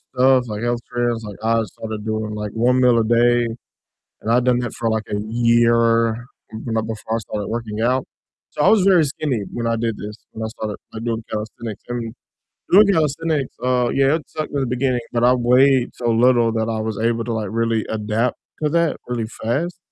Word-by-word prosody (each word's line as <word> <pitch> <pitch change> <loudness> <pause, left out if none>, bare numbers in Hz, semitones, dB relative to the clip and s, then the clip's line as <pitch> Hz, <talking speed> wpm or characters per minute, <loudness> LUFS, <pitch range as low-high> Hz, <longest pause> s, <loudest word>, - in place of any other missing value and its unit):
stuff, 130 -1 +4
like, 105 0 -5
health 120 0 0
trends, 120 -1 -1
like 105 -2 -8
I 115 0 +2
started 110 0 -7
doing, 110 -1 -2
like, 105 -1 -4
1 125 +3 +2
meal 125 -2 +5
a - - +2
day, 120 +1 +3 0.8
and 110 - -3
I'd 120 +1 +3
done 125 -1 +3
that 120 - -4
for, 115 -1 -1
like, 110 0 -1
a 105 - -1
year 115 0 +2 0.3
b 110 - -6
know, 110 - +1
before 110 0 -4
I - - -1
started 105 -1 -5
working 110 -2 -4
out. 125 +3 +1 0.5
So, - - -2
I - - +5
was 215 -3 +5
very 185 -4 +5
skinny 135 -5 -2
when 120 -1 -3
I 115 0 +1
did 115 -1 -1
this, 105 +1 -7 0.2
when 110 - -5
I - - -2
started, 110 -2 -5 0.2
like, 110 +1 -6
doing 115 -1 -2
calisthenics 110 0 -5
I - - -1
mean, 115 -2 -4 0.6
doing 205 +3 +7
calisthenics, 160 -5 0
uh, 125 -1 +2
yeah, 135 +2 +3
it 160 - -4
sucked 155 -1 -5
in 145 - 0
the 130 - -1
beginning, 125 0 0
but 120 0 +1
I 125 +1 +6
weighed 125 +1 +3
so 120 - -2
little 120 0 +4
that 110 0 -1
I 110 -1 -2
was 110 -1 -3
able 115 0 0
to, 120 - -2
like, 110 -2 -2
really 115 -1 0
adapt 110 +3 -1 0.3
to 150 - +2
that 170 0 +1
really 120 -2 -2 0.2
fast, 155 +11 -1
115 Hz, 215 wpm, -21 LUFS, 110-125 Hz, 0.8 s, doing